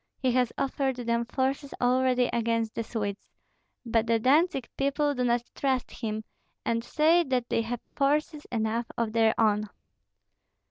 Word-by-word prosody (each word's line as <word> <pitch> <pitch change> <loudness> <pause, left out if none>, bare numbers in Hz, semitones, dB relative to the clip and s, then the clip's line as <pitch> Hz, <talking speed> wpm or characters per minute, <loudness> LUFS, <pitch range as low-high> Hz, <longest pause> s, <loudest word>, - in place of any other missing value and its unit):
He 260 -2 +1
has 250 -1 +2
offered 270 -1 0
them 235 -1 -1
forces 270 +3 -2
already 250 0 +3
against 230 -1 0
the 230 - -2
Swedes; 205 -3 -4 0.6
but 230 -1 +1
the 230 0 +3
Dantzig 275 +1 +3
people 285 +1 +1
do 250 -2 -1
not 240 -1 +2
trust 265 -3 -1
him, 220 -2 -4 0.4
and 230 0 0
say 320 +7 +3
that 255 -3 0
they - - +1
have 230 +1 -4
forces 300 +2 0
enough 230 0 -1
of 230 -2 0
their 225 -1 +3
own." 215 -1 +2
245 Hz, 150 wpm, -28 LUFS, 230-270 Hz, 0.6 s, already